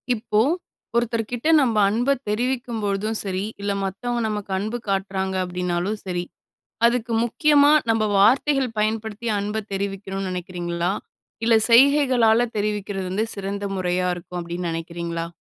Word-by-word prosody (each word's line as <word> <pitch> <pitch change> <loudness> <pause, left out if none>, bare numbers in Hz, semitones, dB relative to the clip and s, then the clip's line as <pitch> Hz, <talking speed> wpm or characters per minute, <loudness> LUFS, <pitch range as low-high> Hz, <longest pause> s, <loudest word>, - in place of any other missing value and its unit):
இப்போ, 215 -1 0 0.6
ஒருத்தர் 230 -2 0
கிட்ட 245 +5 -2
நம்ம 250 -6 +2
அன்பை 245 +6 +2 0.2
தெரிவிக்கும் 240 +1 -1
பொழுதும் 205 +2 0
சரி, 190 -1 -2 0.2
இல்ல 200 0 -1
மத்தவங்க 235 +5 -2
நமக்கு 210 -2 -4
அன்பு 215 +5 -2
காட்டுறாங்க 190 -1 -1
அப்படினாலும் 180 +3 -2
சரி. 175 -1 -2 0.6
அதுக்கு 235 0 +1
முக்கியமா 290 +4 +4 0.2
நம்ம 225 -1 +3
வார்த்தைகள் 260 +3 +3
பயன்படுத்தி, 220 +1 -2
அன்பைத் 210 +1 -4
தெரிவிக்கணும்னு 195 -1 -3
நினைக்கிறீங்களா? 175 -1 -3 0.5
இல்லை 225 -1 +5
செய்கைகளால் 245 -3 +5
தெரிவிக்கிறது 205 -2 -2
வந்து, 210 +4 0
சிறந்த 200 0 -4
முறையா 180 0 0
இருக்கும் 175 0 -7
அப்படின்னு 170 +1 -4
நினைக்கிறீங்களா? 170 0 -4
210 Hz, 125 wpm, -23 LUFS, 190-235 Hz, 0.6 s, இல்லை